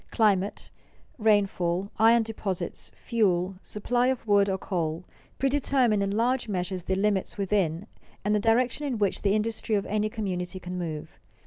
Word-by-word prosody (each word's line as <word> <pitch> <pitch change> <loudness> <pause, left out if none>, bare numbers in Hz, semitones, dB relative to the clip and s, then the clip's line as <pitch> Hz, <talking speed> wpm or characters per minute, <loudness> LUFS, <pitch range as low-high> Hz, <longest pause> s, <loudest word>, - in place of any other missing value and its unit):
Climate, 205 -3 +1 0.5
rainfall, 200 -3 +1
iron 225 +1 +6
deposits, 210 -4 -4
fuel, 190 -5 0
supply 240 +4 0
of 260 -3 -1
wood 200 -2 +4
or 190 - 0
coal, 170 -3 -2 0.3
predetermine 265 -5 +2
in 200 - 0
large 235 +5 +1
measure 185 -1 -2
the 190 +2 -2
limits 200 0 0
within, 195 -3 0 0.4
and 210 - +2
the 210 - +3
direction 245 +6 +1
in 255 -4 -2
which, 205 -2 0
the 200 0 +2
industry 220 0 -1
of 200 - 0
any 215 0 0
community 185 -4 -3
can 180 0 -6
move. 155 -3 -6
205 Hz, 150 wpm, -27 LUFS, 185-225 Hz, 0.5 s, iron